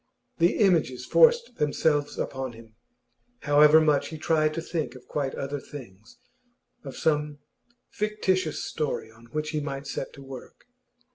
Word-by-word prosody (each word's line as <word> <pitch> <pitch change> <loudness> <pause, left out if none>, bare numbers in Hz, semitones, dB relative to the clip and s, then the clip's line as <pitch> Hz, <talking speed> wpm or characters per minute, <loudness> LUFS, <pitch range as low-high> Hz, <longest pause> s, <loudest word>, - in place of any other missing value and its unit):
The 170 +1 +3
images 160 - +2
forced 475 - +4
themselves 145 0 +1
upon 130 -2 -3
him, 115 -1 -15 0.7
however 150 +2 +6
much 145 -2 +2
he 160 - -7
tried 155 0 +2
to - - -2
think 165 -5 -3
of 125 - -13
quite 140 -3 -2
other 140 +1 -4
things 115 -7 -12 0.7
of 135 -3 -8
some 150 -2 0 0.5
fictitious 190 -6 -1
story 150 -7 -3
on 115 +1 -18
which 155 +6 -4
he 155 - -1
might 140 -1 -5
set - - -4
to 140 - -12
work. 135 -2 -11
145 Hz, 145 wpm, -26 LUFS, 135-160 Hz, 0.7 s, however